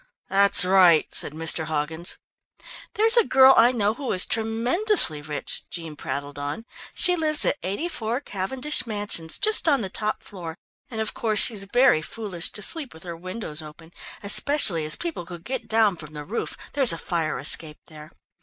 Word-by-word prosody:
"That's 200 Hz, -1 st, +6 dB
right," 180 Hz, -4 st, +3 dB
said -, -, +3 dB
Mr. 160 Hz, 0 st, -1 dB
Hoggins. 160 Hz, +2 st, -2 dB, 0.8 s
"There's 450 Hz, +3 st, +5 dB
a 470 Hz, -, +5 dB
girl 265 Hz, -6 st, +4 dB
I 235 Hz, +2 st, +4 dB
know 215 Hz, -4 st, -2 dB
who 265 Hz, +2 st, -7 dB
is 185 Hz, -, +2 dB
tremendously 230 Hz, -, 0 dB
rich," 150 Hz, -1 st, -4 dB
Jean 165 Hz, -3 st, -8 dB
prattled 140 Hz, +1 st, -8 dB
on. 145 Hz, +10 st, -7 dB, 0.3 s
"She 360 Hz, -, +4 dB
lives 310 Hz, -2 st, +1 dB
at -, -, -2 dB
84, 230 Hz, -, -5 dB
Cavendish 255 Hz, +6 st, -1 dB
Mansions, 205 Hz, -7 st, 0 dB
just 430 Hz, -3 st, +2 dB
on 280 Hz, -5 st, +2 dB
the 195 Hz, -, -5 dB
top 215 Hz, 0 st, -5 dB
floor, 170 Hz, -5 st, -10 dB, 0.3 s
and, 220 Hz, -2 st, -6 dB
of 220 Hz, -, -4 dB
course, 220 Hz, -2 st, -3 dB
she's 205 Hz, -2 st, +2 dB
very 245 Hz, -5 st, +1 dB
foolish 185 Hz, -1 st, -5 dB
to 210 Hz, -, 0 dB
sleep 300 Hz, -, -2 dB
with 160 Hz, -, -9 dB
her 170 Hz, -2 st, -9 dB
windows 180 Hz, -2 st, -7 dB
open, 160 Hz, +2 st, -14 dB, 0.3 s
especially 200 Hz, -, +5 dB
as 155 Hz, -, +3 dB
people 335 Hz, -, -7 dB
could 170 Hz, -1 st, -12 dB
get 260 Hz, +3 st, -7 dB
down 220 Hz, -3 st, +1 dB
from 155 Hz, -1 st, -13 dB
the 150 Hz, 0 st, -9 dB
roof 220 Hz, +8 st, -6 dB, 0.2 s
there 285 Hz, -, -3 dB
is 245 Hz, -10 st, +9 dB
a -, -, -4 dB
fire 165 Hz, -3 st, -4 dB
escape 150 Hz, +3 st, -1 dB
there. 155 Hz, -2 st, -15 dB
200 Hz, 180 wpm, -21 LUFS, 160-245 Hz, 0.8 s, is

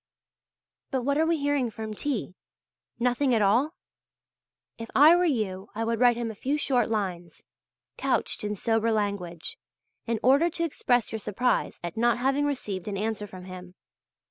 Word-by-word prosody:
But 260 Hz, -2 st, -1 dB
what 280 Hz, +3 st, +1 dB
are 320 Hz, -, +3 dB
we 335 Hz, 0 st, +2 dB
hearing 285 Hz, -4 st, 0 dB
from 220 Hz, 0 st, -6 dB
T.? 235 Hz, -5 st, -3 dB, 0.7 s
Nothing 250 Hz, +1 st, +2 dB
at 220 Hz, -, +2 dB
all? 250 Hz, -, +2 dB, 1.0 s
If 230 Hz, -, -7 dB
I 305 Hz, +5 st, +8 dB
were 355 Hz, +1 st, +3 dB
you 210 Hz, -, -1 dB
I 225 Hz, -, -1 dB
would 230 Hz, 0 st, -1 dB
write 245 Hz, -1 st, +5 dB
him 235 Hz, -2 st, -2 dB
a -, -, -8 dB
few 270 Hz, +8 st, -1 dB
short 250 Hz, -6 st, +1 dB
lines, 185 Hz, -6 st, -3 dB, 0.5 s
couched -, -, 0 dB
in 210 Hz, 0 st, -2 dB
sober 225 Hz, +2 st, +1 dB
language, 200 Hz, -6 st, -3 dB, 0.5 s
in 230 Hz, -1 st, 0 dB
order 280 Hz, +7 st, +5 dB
to 335 Hz, 0 st, -3 dB
express 245 Hz, -7 st, +1 dB
your 220 Hz, -, -3 dB
surprise 235 Hz, +5 st, -1 dB
at 175 Hz, +5 st, -5 dB
not 235 Hz, 0 st, +3 dB
having 270 Hz, +3 st, +1 dB
received 210 Hz, -10 st, -4 dB
an 200 Hz, -1 st, -3 dB
answer 210 Hz, 0 st, -2 dB
from 185 Hz, -2 st, -10 dB
him. 185 Hz, -1 st, -10 dB
230 Hz, 170 wpm, -27 LUFS, 205-270 Hz, 1.0 s, I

